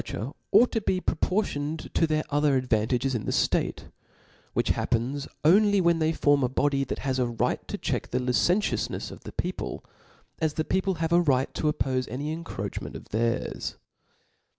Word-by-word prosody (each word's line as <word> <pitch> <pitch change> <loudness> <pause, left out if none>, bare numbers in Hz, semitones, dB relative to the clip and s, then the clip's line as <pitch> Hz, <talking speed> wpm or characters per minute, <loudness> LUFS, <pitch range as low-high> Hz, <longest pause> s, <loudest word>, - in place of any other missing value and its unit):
^^t^r® 120 +8 -5 0.2
ought 245 - +6
to 225 - 0
be 185 -2 0
proportiofted 160 -4 -1
to 165 - +3
tUtit 155 0 +1
other 145 -1 +3
ad* 130 0 -2
vantages 120 +4 +1
in 115 - -2
the - - 0
ftate - - +1
s - - -15 0.7
which - - +2
happenis 125 +4 -1 0.2
only 205 +4 +5
wbeo 170 -2 +3
they 160 0 +2
form 145 -3 +3
a 125 - +2
body 140 +1 +1
that 135 - -4
has 130 -1 0
a 120 -1 +1
Tight - - -1
to - - -4
check - - -2
the 125 - -1
li 125 0 0
centiournefs 180 - +1
of - - -11
the - - -6
people, - - -4 0.5
as 160 -2 0
the 155 - -1
people 190 0 0
have 165 0 -1
a 175 - +6
right 135 -5 +1
to 150 - +1
oppofe 130 -3 -1
any 140 +6 -3
encroachment 165 +1 -5
of - - -10
theirs. 115 +2 -1
145 Hz, 190 wpm, -27 LUFS, 130-165 Hz, 0.7 s, ought